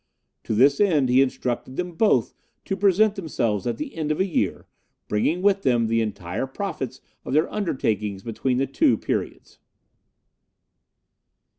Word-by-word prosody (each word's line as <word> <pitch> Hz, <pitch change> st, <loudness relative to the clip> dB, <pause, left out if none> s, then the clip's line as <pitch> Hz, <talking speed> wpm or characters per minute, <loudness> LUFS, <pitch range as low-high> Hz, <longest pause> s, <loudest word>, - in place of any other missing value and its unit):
To 110 Hz, -, -1 dB
this 140 Hz, +5 st, +4 dB
end 155 Hz, -10 st, +3 dB
he 125 Hz, +2 st, +5 dB
instructed 130 Hz, -1 st, -2 dB
them 180 Hz, +3 st, -3 dB
both 165 Hz, -, +2 dB, 0.3 s
to 195 Hz, -, -1 dB
present 200 Hz, +2 st, +3 dB
themselves 120 Hz, -, -2 dB
at -, -, -1 dB
the 300 Hz, -2 st, -6 dB
end 155 Hz, -2 st, -2 dB
of 155 Hz, -, -1 dB
a 190 Hz, -, +3 dB
year, 185 Hz, -, -1 dB, 0.4 s
bringing 155 Hz, -, 0 dB
with 200 Hz, -1 st, +3 dB
them 120 Hz, -7 st, +2 dB
the 115 Hz, +1 st, +1 dB
entire 105 Hz, +1 st, -3 dB
profits 135 Hz, -, -5 dB, 0.2 s
of -, -, -5 dB
their 155 Hz, +3 st, +3 dB
undertakings 105 Hz, -, -2 dB
between 125 Hz, +2 st, -1 dB
the 135 Hz, -, +1 dB
two 300 Hz, -, +2 dB
periods. -, -, -4 dB
135 Hz, 150 wpm, -24 LUFS, 115-190 Hz, 0.4 s, he